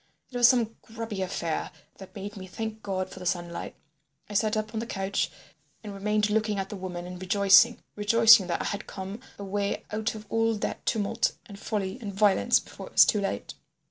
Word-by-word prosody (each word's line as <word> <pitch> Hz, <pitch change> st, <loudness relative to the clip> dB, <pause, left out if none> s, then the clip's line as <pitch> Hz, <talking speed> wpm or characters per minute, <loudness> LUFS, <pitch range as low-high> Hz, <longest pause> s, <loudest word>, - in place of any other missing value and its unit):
It 250 Hz, -, -4 dB
was 240 Hz, -1 st, +7 dB
some 235 Hz, -3 st, +2 dB
grubby 225 Hz, -3 st, -6 dB
affair 170 Hz, -3 st, -2 dB, 0.3 s
that 190 Hz, +2 st, -12 dB
made 205 Hz, +1 st, -6 dB
me 190 Hz, -2 st, -8 dB
thank 220 Hz, +3 st, -5 dB
God 190 Hz, -2 st, -3 dB
for -, -, -9 dB
the 180 Hz, -, -8 dB
sunlight. 175 Hz, -1 st, -3 dB, 0.5 s
I 210 Hz, -, -9 dB
sat 215 Hz, +1 st, +2 dB
up 215 Hz, +1 st, -3 dB
on 220 Hz, -, -2 dB
the 230 Hz, -, -4 dB
couch 195 Hz, -1 st, -1 dB, 0.5 s
and 210 Hz, -2 st, -7 dB
remained 210 Hz, +1 st, 0 dB
looking 215 Hz, -1 st, +1 dB
at 195 Hz, 0 st, -3 dB
the -, -, -6 dB
woman 180 Hz, -2 st, -6 dB
and 180 Hz, 0 st, -8 dB
rejoicing—rejoicing 205 Hz, +2 st, +5 dB
that 170 Hz, -, -1 dB
I -, -, -5 dB
had 200 Hz, 0 st, -4 dB
come 195 Hz, +3 st, -6 dB, 0.2 s
away 200 Hz, 0 st, -2 dB
out 215 Hz, +1 st, -2 dB
of 215 Hz, 0 st, -9 dB
all 225 Hz, +1 st, +1 dB
that 205 Hz, -, -4 dB
tumult 225 Hz, +1 st, +1 dB
and 200 Hz, -3 st, -11 dB
folly 200 Hz, +1 st, -3 dB
and 205 Hz, -3 st, -4 dB
violence 200 Hz, 0 st, +3 dB
before -, -, -10 dB
it -, -, -15 dB
was -, -, +8 dB
too 210 Hz, -, +1 dB
late. 195 Hz, -, -3 dB
205 Hz, 200 wpm, -27 LUFS, 190-220 Hz, 0.5 s, was